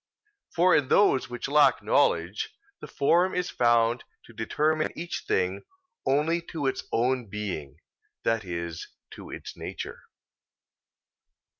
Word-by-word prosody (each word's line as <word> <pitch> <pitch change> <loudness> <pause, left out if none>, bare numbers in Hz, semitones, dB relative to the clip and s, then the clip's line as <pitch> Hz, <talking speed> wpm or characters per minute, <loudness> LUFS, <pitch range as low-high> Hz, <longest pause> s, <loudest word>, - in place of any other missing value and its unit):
For 180 +2 +5
in 140 - +2
those 135 -7 +3
which 120 +1 -4
lack 145 +1 +4
knowledge, 85 +5 +1 0.3
the - - -8
form 175 +6 +2
is 180 0 -1
found 120 0 +3 0.2
to 115 - -15
determine 155 +8 0
each 170 +1 -5
thing 95 +1 0 0.5
only 150 +5 +2
to 155 -4 -2
its 135 - -1
own 125 0 +1
being 95 -9 -5 0.5
that 115 -1 +1
is, 85 -2 -5 0.2
to - - -10
its - - -8
nature. - - -7
125 Hz, 125 wpm, -27 LUFS, 105-155 Hz, 0.5 s, For